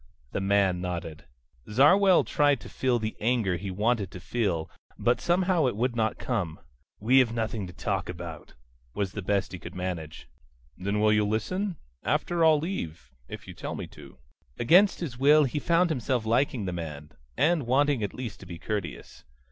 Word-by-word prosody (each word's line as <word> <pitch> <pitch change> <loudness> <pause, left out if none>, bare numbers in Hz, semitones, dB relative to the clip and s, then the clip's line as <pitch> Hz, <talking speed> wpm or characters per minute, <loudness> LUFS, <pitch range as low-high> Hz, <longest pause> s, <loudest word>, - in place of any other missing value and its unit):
The - - -2
man 95 -2 +2
nodded. 85 -4 -5 0.4
Zarwell 180 - +5
tried 145 -3 +2
to - - -10
feel 130 -2 0
the 110 -1 -3
anger 110 -5 +1
he 100 +3 -5
wanted 105 +1 0
to 90 - -9
feel, 90 -4 -1 0.3
but 120 +1 +1
somehow 175 -2 +2
it 120 - -1
would 120 +2 0
not 110 -1 0
come. 95 -11 -3 0.4
"We 125 +6 +5
have 115 -3 +2
nothing 110 -3 -2
to 90 - -10
talk 95 +1 -2
about," 85 -2 -8 0.4
was 100 -3 -1
the 100 - -5
best 100 +1 0
he 90 - -7
could 85 +3 -10
manage. 90 -4 -5 0.5
"Then 100 +3 -2
will 105 0 +4
you 105 - +3
just 105 - 0
listen? 185 - -2 0.3
After, 170 -1 0
I'll 160 -1 +6
leave 85 - -5 0.2
if - - -9
you - - -8
tell - - -6
me - - -5
to." - - -14 0.4
Against 180 - +4
his 130 -8 -5
will 150 +3 +6
he 140 +2 -1
found 170 +2 +2
himself 125 -4 -1
liking 120 -1 +1
the 90 - -3
man, 75 -3 -6 0.3
and 155 -4 +2
wanting 140 0 +2
at 100 - -3
least 125 -4 -6
to 95 - -12
be 85 -1 -7
courteous. 100 -4 -5
110 Hz, 185 wpm, -27 LUFS, 90-135 Hz, 0.5 s, I'll